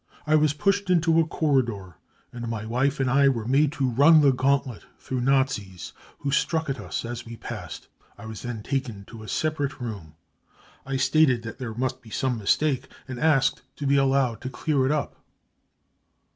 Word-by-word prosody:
I 155 - +1
was 155 -1 +4
pushed 195 +6 0
into 165 -2 +3
a 165 - +2
corridor, 120 - 0 0.4
and 120 -1 -6
my 110 -2 -4
wife 130 +5 0
and 135 - +1
I 140 +2 +4
were 115 -5 -2
made 140 +4 +3
to 135 -2 0
run 145 +6 +6
the 140 -2 +5
gauntlet 130 -2 0
through 130 -1 -4
Nazis 125 -9 0 0.3
who 140 - -2
struck 160 0 0
at 135 - -5
us 90 +2 -4
as 120 0 -5
we 115 0 -9
passed. - - -8 0.3
I 115 - -11
was 110 -1 -7
then 120 -3 -5
taken 125 -8 -3
to 115 +1 -11
a 110 - -10
separate 150 -1 -2
room. 100 -11 -7 0.7
I 135 0 -1
stated 130 -2 +3
that 115 +3 -8
there 115 -4 -5
must 130 +1 -2
be 115 - -15
some 125 +1 -1
mistake 130 +5 +1 0.2
and 130 -2 -6
asked 150 -4 +2
to 145 - -5
be 140 +1 +3
allowed 135 -3 +2
to 130 - -4
clear 135 0 0
it - - +1
up." 150 -1 -3
130 Hz, 185 wpm, -25 LUFS, 115-145 Hz, 0.7 s, run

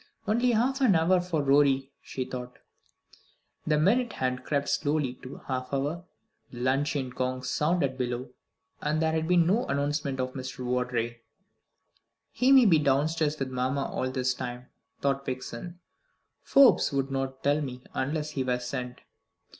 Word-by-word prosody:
"Only 240 +3 +2
half 260 +5 +1
an 230 -8 +5
hour 175 +3 +3
for 170 -4 -1
Rorie," 135 -1 +3
she 130 - -5
thought. 125 -1 -7 1.1
The 155 -1 +3
minute 230 +10 +2
hand 130 0 -2
crept 140 0 -1
slowly 145 -4 0
to 130 - -9
the - - -9
half 130 -1 -3
hour, 145 +6 -2 0.4
the 120 - -10
luncheon 135 +1 0
gong 130 0 -3
sounded 145 -1 0
below, 125 0 -3 0.5
and 150 +1 0
there 160 0 +2
had 160 0 -1
been 175 -1 +4
no 205 +8 +1
announcement 140 -1 -1
of 130 0 -2
Mr. 130 -1 -6
Vawdrey. 125 -2 -1 1.1
"He 250 +3 +2
may 265 -3 +8
be 165 -7 +5
downstairs 150 +2 +1
with 135 -2 -3
mamma 130 +2 -1
all 130 - -2
this 130 -1 0
time," 125 0 -6 0.3
thought 140 0 0
Vixen. 130 +6 -6 0.6
"Forbes 275 -2 +5
would 135 -1 -1
not 135 0 -3
tell 145 +2 +2
me, 125 -3 -6
unless 150 +3 -2
he 135 -3 -2
were 125 -1 0
sent." 125 0 -5
140 Hz, 155 wpm, -28 LUFS, 130-160 Hz, 1.1 s, may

